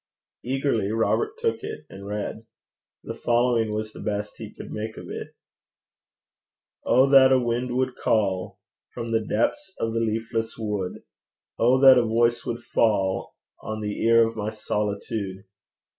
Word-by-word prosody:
Eagerly 125 -5 0
Robert 420 - 0
took 460 -1 -1
it, 435 +2 -7
and 100 +1 -10
read. 105 +2 -5 0.6
The - - -5
following 120 -2 +1
was 110 0 -3
the - - -10
best 105 0 -3
he - - -7
could - - -10
make 110 +1 -5
of - - -8
it: - - -7 1.5
Oh 130 +2 +4
that 135 -1 +8
a 130 - +6
wind 120 +1 -1
would 130 -1 0
call 95 -4 0 0.4
From 115 -1 -4
the 115 -1 +1
depths 190 - -1
of 115 0 -1
the 115 - 0
leafless 115 0 -2
wood! 105 -5 -3 0.6
Oh 125 +3 +4
that 130 -2 +9
a - - +2
voice 120 +1 +2
would 120 0 -3
fall 95 -5 +1 0.3
On 110 0 -5
the 105 -1 -3
ear 115 0 +5
of 115 - -7
my 105 -1 -2
solitude! 105 -2 -3
115 Hz, 155 wpm, -25 LUFS, 105-125 Hz, 1.5 s, that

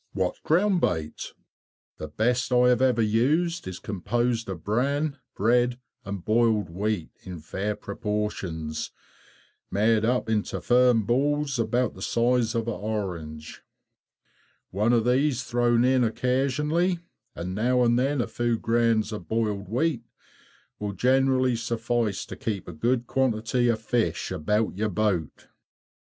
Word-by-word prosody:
What 95 -2 -2
ground 180 +3 +2
bait_? 80 -2 -2 0.6
The 80 - -6
best 120 - 0
I 125 0 +5
have 125 +1 +3
ever 125 -3 +3
used 145 - +1
is 95 -1 -5
composed 115 +3 -2
of 90 -4 -6
bran, 140 +6 0 0.2
bread, 120 +3 +2 0.2
and 100 -2 -6
boiled 110 -5 +2
wheat, 100 -1 -2
in 90 -2 -8
fair 95 +7 -3
proportions, 100 -7 -4 0.8
made 110 +2 +2
up 125 +1 +1
into 110 -2 -1
firm 125 -2 +4
balls 140 +4 0
about 120 +1 +1
the 95 - -12
size 120 +1 +1
of 115 0 -1
an 115 - -1
orange. 90 -9 -5 1.1
One 105 +5 +1
of 115 -2 +3
these 130 +1 +2
thrown 120 0 +2
in 130 -1 +3
occasionally, 140 +9 +1 0.4
and 90 +2 -4
now 125 +5 +2
and 120 0 +3
then 135 +1 +1
a - - -2
few 120 -1 -1
grains 115 -1 +1
of 105 -6 -7
boiled 105 -4 -1
wheat 130 +2 0 0.8
will 105 -1 -3
generally 130 +3 +2
suffice 115 -2 -1
to - - -8
keep 105 -4 -4
a 90 - -7
good 120 +9 0
quantity 120 -1 +1
of 115 -2 +1
fish 115 -1 -1
about 105 +6 0
your 105 +2 -1
boat. 95 -5 0 0.2
_7. - - -31
115 Hz, 140 wpm, -26 LUFS, 105-125 Hz, 1.1 s, I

